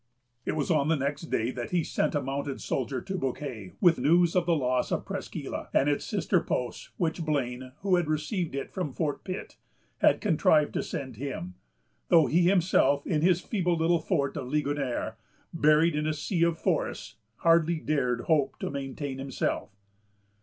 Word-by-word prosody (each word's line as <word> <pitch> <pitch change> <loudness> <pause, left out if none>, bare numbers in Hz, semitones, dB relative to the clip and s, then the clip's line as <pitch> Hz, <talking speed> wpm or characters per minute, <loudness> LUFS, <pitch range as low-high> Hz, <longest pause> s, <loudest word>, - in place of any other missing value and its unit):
It - - +1
was 155 +1 -1
on 150 -3 +2
the 165 - +3
next 140 +3 -2
day 115 +3 0
that 120 -2 -5
he 175 -2 +1
sent - - -1
a 145 - 0
mounted 135 +1 -3
soldier 130 -1 -2
to 190 - -3
Bouquet 125 - -4
with 175 -7 +5
news 170 +6 +4
of 180 -2 +2
the 170 - +4
loss 130 -3 0
of - - -1
Presqu' - - -5
Isle - - -5
and 135 - +4
its 145 -1 0
sister 190 -2 +1
posts, 125 -1 -3
which 165 0 -1
Blane, 130 -4 -2
who 190 -2 +3
had 175 -3 0
received 155 +1 -2
it 140 - -4
from 180 -8 -3
Fort 150 -1 -2
Pitt, 185 0 -6 0.4
had - - +4
contrived 155 -1 +3
to - - 0
send 130 -5 -5
him; 120 -9 -5 0.5
though 165 -3 +6
he 160 +7 +3
himself, 160 -7 +3
in 155 -4 0
his 180 +1 +3
feeble 180 -6 0
little 165 +1 +3
fort 145 -5 -1
of 135 -4 -4
Ligonier, 140 -5 -1 0.4
buried 155 0 +4
in 150 0 0
a 155 - 0
sea 165 +3 -2
of 170 -1 +3
forests, - - -2 0.2
hardly 165 +3 +3
dared 135 -6 0
hope 150 0 +1
to - - -4
maintain 135 0 -5
himself. 135 -7 -2
150 Hz, 180 wpm, -28 LUFS, 135-170 Hz, 0.5 s, though